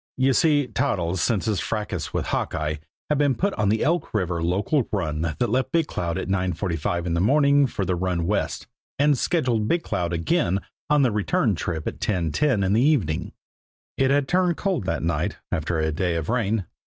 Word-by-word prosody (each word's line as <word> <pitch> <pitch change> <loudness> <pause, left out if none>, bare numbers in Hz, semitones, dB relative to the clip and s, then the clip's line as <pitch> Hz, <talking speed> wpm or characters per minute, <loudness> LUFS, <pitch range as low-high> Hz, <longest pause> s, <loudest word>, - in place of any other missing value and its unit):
You 130 +1 +3
see, 145 -1 +3
Toddles, 95 - -1
since 110 -1 +1
his 110 -3 0
fracas 95 -8 -3
with - - -2
Hawkeye, 75 -1 -2 0.3
had 150 -1 +1
been 140 -3 +3
put 200 +1 0
on 105 -3 0
the 110 +1 +1
Elk 170 -6 0
River 90 -4 0
local 100 - +1
run 80 -7 -1
that 80 +8 -1
left 130 +2 0
Big 165 -2 +2
Cloud 85 - -3
at - - -3
9.45 90 -2 -1
in 85 - -1
the 85 - +1
morning 140 +5 +4
for 100 -5 -3
the 90 0 0
run 90 -1 -1
west, 80 -8 -1 0.3
and 145 +1 +4
scheduled 125 -7 0
Big 170 +5 +1
Cloud 85 -1 -2
again 90 - +1 0.3
on 150 -1 +4
the 125 - +3
return 105 +1 +1
trip 80 -2 -3
at - - -4
10.10 100 - +1
in 95 - +1
the 110 - +3
evening. 95 - +1 0.6
It 135 -1 +2
had 140 0 +2
turned 180 -1 +2
cold 190 - -1
that 95 - -2
night, 85 +1 -1
after 80 -1 -1
a 80 0 0
day 85 +2 -1
of 80 -2 -3
rain. 110 -4 0
100 Hz, 195 wpm, -24 LUFS, 85-135 Hz, 0.6 s, morning